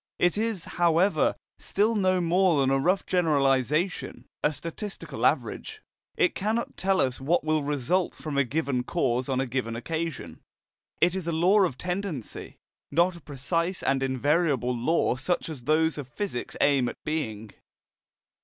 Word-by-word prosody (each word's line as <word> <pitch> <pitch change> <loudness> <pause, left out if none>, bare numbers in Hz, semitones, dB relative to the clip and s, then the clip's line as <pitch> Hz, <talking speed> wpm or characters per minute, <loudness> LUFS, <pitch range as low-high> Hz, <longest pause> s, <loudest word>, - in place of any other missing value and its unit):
It 175 - +2
is, 215 -4 -1
however, 175 +3 +2 0.2
still 215 +3 +1
no 185 -3 +2
more 175 -1 +3
than 135 -1 +2
a 135 - +3
rough 180 +7 +1
generalization, 150 - +1 0.2
a - - +3
statistical 165 +7 -3
average. 435 - -2 0.4
It 385 -5 +3
cannot 220 +4 -2
tell 190 0 +1
us 130 0 0
what 160 +6 +1
will 155 0 +1
result 150 +6 0
from 150 -2 -6
a 140 - +4
given 140 -1 -1
cause 125 -4 0
on 130 -1 0
a 135 - +1
given 120 -2 -3
occasion. 160 +3 -4 0.6
It 175 0 +4
is 185 -3 -4
a - - +1
law 180 +6 +4
of 170 -10 +1
tendency, 180 - -5 0.3
not 175 +2 +2
a 170 - -12
precise 165 +6 -2
and 135 -1 +1
invariable 135 -1 +1
law 125 +1 +1
such 170 +6 -1
as 135 -7 -8
those 155 +1 +2
of 140 - -6
physics 130 -1 -4
aim 135 -4 +3
at - - -9
being. 110 -9 -3
160 Hz, 155 wpm, -27 LUFS, 135-180 Hz, 0.6 s, a